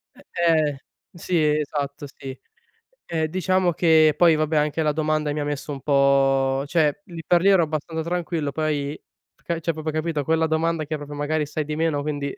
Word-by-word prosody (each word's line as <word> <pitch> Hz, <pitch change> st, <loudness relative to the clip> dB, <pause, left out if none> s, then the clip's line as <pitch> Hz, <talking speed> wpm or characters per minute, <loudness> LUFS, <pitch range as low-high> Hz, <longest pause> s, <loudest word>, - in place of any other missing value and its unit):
Eh, -, -, -17 dB, 0.3 s
ehm 155 Hz, -3 st, +2 dB, 0.4 s
sì, 175 Hz, +1 st, -3 dB, 0.2 s
esatto, 145 Hz, -1 st, -4 dB
sì. 135 Hz, -1 st, -9 dB, 0.7 s
Ehm, 160 Hz, -2 st, -1 dB
diciamo 185 Hz, +2 st, +1 dB
che 155 Hz, -2 st, +4 dB
poi, 170 Hz, -2 st, +5 dB
vabbè, 155 Hz, 0 st, 0 dB
anche 150 Hz, +2 st, 0 dB
la 150 Hz, -, +2 dB
domanda 155 Hz, -1 st, -1 dB
mi 150 Hz, -, -3 dB
ha -, -, -1 dB
messo 145 Hz, 0 st, -4 dB
un 135 Hz, -2 st, -6 dB
po 135 Hz, -1 st, +2 dB
cioè 155 Hz, +1 st, +1 dB
lì 170 Hz, -4 st, -9 dB
per 175 Hz, -1 st, +3 dB
lì, 195 Hz, -, +4 dB
ero 190 Hz, -4 st, +5 dB
abbastanza 160 Hz, +1 st, -3 dB
tranquillo, 170 Hz, -4 st, -2 dB
poi, 150 Hz, -1 st, -2 dB, 0.4 s
f -, -, -34 dB
car 170 Hz, -1 st, -2 dB
cioè, 165 Hz, 0 st, -1 dB
proprio 155 Hz, 0 st, -4 dB
capito? 155 Hz, -1 st, -2 dB
Quella 160 Hz, +2 st, +1 dB
domanda 160 Hz, 0 st, 0 dB
che 155 Hz, +1 st, -3 dB
proprio 145 Hz, 0 st, -8 dB
magari 150 Hz, +1 st, -1 dB
sai 150 Hz, +1 st, -4 dB
di 150 Hz, -, -4 dB
meno, 155 Hz, -2 st, 0 dB
quindi 145 Hz, -2 st, -3 dB
155 Hz, 195 wpm, -23 LUFS, 145-165 Hz, 0.7 s, poi